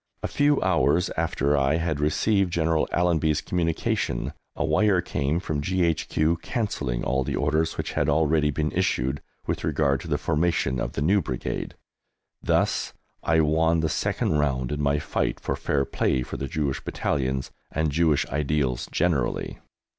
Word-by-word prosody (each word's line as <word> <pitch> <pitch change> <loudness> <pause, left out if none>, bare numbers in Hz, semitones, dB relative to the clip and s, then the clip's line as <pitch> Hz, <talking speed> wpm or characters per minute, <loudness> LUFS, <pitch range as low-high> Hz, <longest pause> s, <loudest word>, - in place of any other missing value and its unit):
A - - 0
few 145 0 +2
hours 90 -1 +2
after 70 +1 +1
I 70 +1 +2
had 80 -3 -1
received 95 +6 +2
General 80 -1 +1
Allenby's 80 -3 +2
communication 80 -6 -1 0.2
a - - -1
wire 105 -4 +3
came 75 -2 -1
from 75 -5 -3
G.H.Q. 85 -1 +1
cancelling 80 - -2
all 65 +1 +1
the - - -2
orders 80 +3 0
which - - -3
had - - +1
already 75 0 +3
been 75 +1 -1
issued 65 +3 0 0.2
with - - -2
regard 70 -3 +1
to - - -9
the - - 0
formation 80 -5 0
of - - -3
the 70 - -1
new 100 +6 +3
Brigade. 65 -6 -4 0.7
Thus - - +1 0.3
I 80 0 +3
won 80 +2 +2
the 80 - 0
second 75 0 0
round 65 -4 0
in 75 - -2
my 70 0 +2
fight 75 - -1
for - - -2
fair 70 -1 0
play 65 -1 0
for - - -7
the 70 - -4
Jewish 70 -1 -2
Battalions 65 -2 -2 0.2
and 80 0 0
Jewish 80 -1 +2
ideals 70 -3 -1
generally. 80 -9 0
75 Hz, 160 wpm, -25 LUFS, 70-85 Hz, 0.7 s, wire